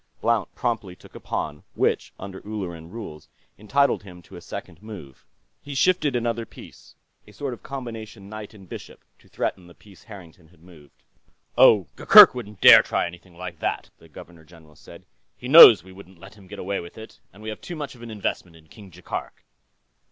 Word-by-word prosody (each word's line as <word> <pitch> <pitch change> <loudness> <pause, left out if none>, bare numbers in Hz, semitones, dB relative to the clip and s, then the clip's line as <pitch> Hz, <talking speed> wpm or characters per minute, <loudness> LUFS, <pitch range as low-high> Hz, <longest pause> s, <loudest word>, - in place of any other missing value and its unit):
Blount 115 -4 0
promptly 110 -7 -3
took - - -19
a - - -10
pawn, 75 -1 -5
which, - - -1
under 95 -1 -9
Ulleran 90 -6 -7
rules, 90 -8 -10 0.3
entitled 140 +7 +1
him 90 -3 -14
to - - -15
a - - -11
second 80 - -10
move. 95 -12 -12 0.3
He 140 -1 -9
shifted 150 -2 +1
another 115 -1 -2
piece, - - -16 0.3
a - - -15
sort 130 +5 -6
of 120 - -12
combination 115 -6 -9
knight 110 0 -10
and 95 -3 -16
bishop, - - -11 0.2
to - - -25
threaten 90 -2 -4
the 85 - -17
piece 100 -5 -20
Harrington 90 -6 -14
had 85 0 -25
moved. 80 -5 -19 0.5
"Oh, 100 -5 +5
Gurgurk - - +9
wouldn't 105 -6 -9
dare - - +9
try - - -2
anything 85 0 -12
like 90 -1 -8
that," - - -4
the - - -19
Governor 85 -2 -14
General 80 -1 -19
said. 70 - -16 0.3
"He 125 - -9
knows 125 - +9
we 95 - -15
wouldn't 95 -1 -15
let 95 +2 -14
him 100 -3 -18
get 105 +2 -10
away 100 +1 -4
with 85 - -11
it. 110 0 -13 0.2
We 110 +1 -8
have 110 - -8
too 175 - -8
much 150 -3 -7
of 120 - -17
an 120 - -10
investment 100 -5 -5
in 80 -1 -21
King 105 -3 -15
Jaikark." 90 +1 -8
100 Hz, 195 wpm, -23 LUFS, 85-115 Hz, 0.5 s, Gurgurk